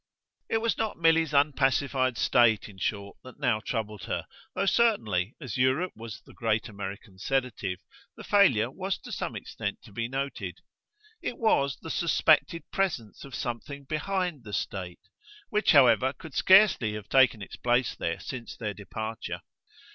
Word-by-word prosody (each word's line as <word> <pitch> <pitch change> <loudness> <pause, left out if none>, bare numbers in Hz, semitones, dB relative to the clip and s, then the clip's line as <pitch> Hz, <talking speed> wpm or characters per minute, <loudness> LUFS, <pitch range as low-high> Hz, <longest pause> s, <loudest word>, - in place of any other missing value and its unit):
It 225 - +1
was 230 0 0
not 220 -1 -1
Milly's 165 -2 +3
unpacified 135 -3 +2
state, 115 -4 +3
in 100 -3 -13
short, 100 0 -3
that 130 - -13
now 110 -3 +2
troubled 105 -3 -4
her - - -3 0.3
though 195 - 0
certainly, 125 - +2
as 130 -6 -5
Europe 130 +8 +2
was 115 -1 -8
the - - -15
great 110 -1 0
American 100 -1 -8
sedative, 115 -6 -1 0.4
the - - -9
failure 130 - +4
was 190 +4 -3
to - - -11
some - - -3
extent 100 - -5
to 110 - -14
be 115 +3 -3
noted: 135 +2 -4 0.6
it 240 - -4
was 140 - +2
the 160 - -6
suspected 165 0 +3
presence 155 - -2
of 140 - -8
something 140 +3 -5
behind 165 0 -2
the 105 -2 -9
state 90 -3 -4 0.5
which, 210 -1 +3
however, 130 -3 +5
could 160 -1 -12
scarcely 190 - +5
have 105 -1 -7
taken 125 -4 +4
its - - -9
place 120 +1 +1
there 85 - -2
since 120 -3 -7
their 105 -3 -3
departure. 110 +2 -6
130 Hz, 155 wpm, -28 LUFS, 110-160 Hz, 0.6 s, however